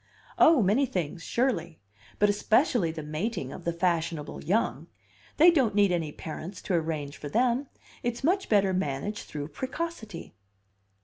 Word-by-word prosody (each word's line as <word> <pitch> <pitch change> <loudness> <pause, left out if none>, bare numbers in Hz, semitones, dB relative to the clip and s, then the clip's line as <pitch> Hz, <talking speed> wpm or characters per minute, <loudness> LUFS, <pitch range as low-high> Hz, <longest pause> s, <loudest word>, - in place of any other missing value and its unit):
"Oh, 310 -8 +6
many 225 +9 +3
things, 175 -4 -3
surely! 175 -9 -1 0.4
But 210 - +4
especially 210 - +2
the 160 -1 -5
mating 155 - -3
of 180 - -10
the 170 - +1
fashionable 170 -3 -1
young. 210 +6 0 0.5
They 335 +3 +8
don't 260 -11 +2
need 200 -2 +4
any 165 -4 -1
parents 165 +5 -7
to 190 - -2
arrange 155 -4 -2
for 145 - -7
them; 245 - +1 0.3
it's 240 +1 -3
much 380 +6 +1
better 195 -3 +3
managed 185 +3 -2
through 145 0 -5
precocity." 255 - -5
190 Hz, 145 wpm, -28 LUFS, 160-240 Hz, 0.5 s, They